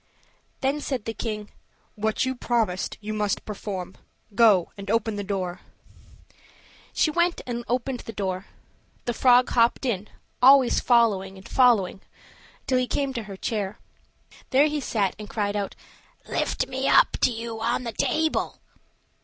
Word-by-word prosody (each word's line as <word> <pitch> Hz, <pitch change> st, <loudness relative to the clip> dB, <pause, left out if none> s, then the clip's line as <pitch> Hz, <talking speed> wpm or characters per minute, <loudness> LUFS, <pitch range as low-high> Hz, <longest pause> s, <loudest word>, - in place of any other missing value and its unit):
Then 275 Hz, +3 st, 0 dB
said 265 Hz, -6 st, -3 dB
the 225 Hz, -, -3 dB
king, 215 Hz, -2 st, -5 dB, 0.4 s
"What 220 Hz, +3 st, 0 dB
you 260 Hz, -, -1 dB
promised 225 Hz, -6 st, -1 dB
you 215 Hz, +1 st, -4 dB
must 210 Hz, -1 st, -1 dB
perform. 195 Hz, -3 st, -6 dB, 0.4 s
Go 200 Hz, -5 st, +4 dB
and 200 Hz, -1 st, -8 dB
open 225 Hz, 0 st, +1 dB
the 205 Hz, -, -3 dB
door." 190 Hz, -3 st, -3 dB, 1.3 s
She 310 Hz, -, +2 dB
went 345 Hz, +2 st, +1 dB
and 240 Hz, -1 st, -4 dB
opened 250 Hz, +1 st, -1 dB
the 225 Hz, -, -8 dB
door; 190 Hz, -2 st, -3 dB, 0.6 s
the 240 Hz, -, -1 dB
frog 250 Hz, +1 st, +5 dB
hopped 235 Hz, +3 st, +3 dB
in, 215 Hz, -5 st, -1 dB, 0.3 s
always 265 Hz, -1 st, +6 dB
following 205 Hz, -6 st, +2 dB
and 190 Hz, -, -12 dB
following 230 Hz, -8 st, +3 dB
her -, -, -31 dB, 0.6 s
till 255 Hz, -1 st, +2 dB
he 250 Hz, -, 0 dB
came 280 Hz, +1 st, -1 dB
up 265 Hz, -, -7 dB
to 230 Hz, -, -3 dB
her 195 Hz, -2 st, -8 dB
chair. 205 Hz, -1 st, -3 dB, 0.7 s
There 275 Hz, +3 st, +5 dB
he 300 Hz, 0 st, 0 dB
sat 205 Hz, -7 st, 0 dB
and 210 Hz, -, -8 dB
cried 205 Hz, -2 st, -1 dB
out, 200 Hz, -1 st, -3 dB, 0.5 s
"Lift -, -, -1 dB
me 265 Hz, +1 st, -2 dB
up -, -, +6 dB
to -, -, +5 dB
you 230 Hz, -1 st, -5 dB
on 235 Hz, +2 st, 0 dB
the 230 Hz, -2 st, -4 dB
table." 315 Hz, +7 st, 0 dB
225 Hz, 160 wpm, -25 LUFS, 205-255 Hz, 1.3 s, always